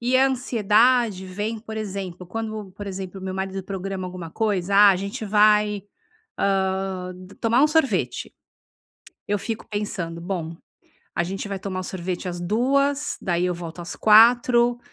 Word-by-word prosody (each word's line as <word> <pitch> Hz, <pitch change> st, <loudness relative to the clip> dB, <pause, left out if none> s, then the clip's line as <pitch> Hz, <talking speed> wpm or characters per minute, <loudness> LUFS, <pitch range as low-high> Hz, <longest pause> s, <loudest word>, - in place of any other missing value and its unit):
E 245 Hz, +2 st, +2 dB
a 265 Hz, +1 st, +5 dB
ansiedade 235 Hz, -3 st, +2 dB
vem, 210 Hz, +4 st, -3 dB
por 220 Hz, 0 st, -8 dB
exemplo, 190 Hz, -4 st, -5 dB
quando, 215 Hz, 0 st, -5 dB
por 205 Hz, +2 st, -8 dB
exemplo, 190 Hz, 0 st, -6 dB
meu 190 Hz, 0 st, -4 dB
marido 190 Hz, 0 st, -3 dB
programa 190 Hz, 0 st, -4 dB
alguma 180 Hz, -2 st, -7 dB
coisa: 200 Hz, -2 st, -1 dB
"Ah, 205 Hz, 0 st, +8 dB
a 190 Hz, -, +2 dB
gente 200 Hz, +3 st, -5 dB
vai, 210 Hz, 0 st, +3 dB, 0.6 s
hã, 190 Hz, -1 st, 0 dB, 0.3 s
tomar 230 Hz, +3 st, +3 dB
um -, -, +7 dB
sorvete", 255 Hz, -, 0 dB, 1.0 s
eu 205 Hz, 0 st, 0 dB
fico 225 Hz, +1 st, -4 dB
pensando: 195 Hz, -5 st, -4 dB
"Bom, 170 Hz, -2 st, -4 dB, 0.6 s
a -, -, +1 dB
gente 195 Hz, +3 st, -5 dB
vai 200 Hz, -1 st, -3 dB
tomar 185 Hz, -1 st, -4 dB
o -, -, -4 dB
sorvete 185 Hz, 0 st, -4 dB
às 175 Hz, -1 st, -5 dB
14:00, 275 Hz, +9 st, +1 dB
daí 175 Hz, -1 st, 0 dB
eu 180 Hz, -, -1 dB
volto 170 Hz, 0 st, -8 dB
às 175 Hz, -, -6 dB
16:00 240 Hz, +2 st, +5 dB
200 Hz, 155 wpm, -23 LUFS, 185-220 Hz, 1.0 s, Ah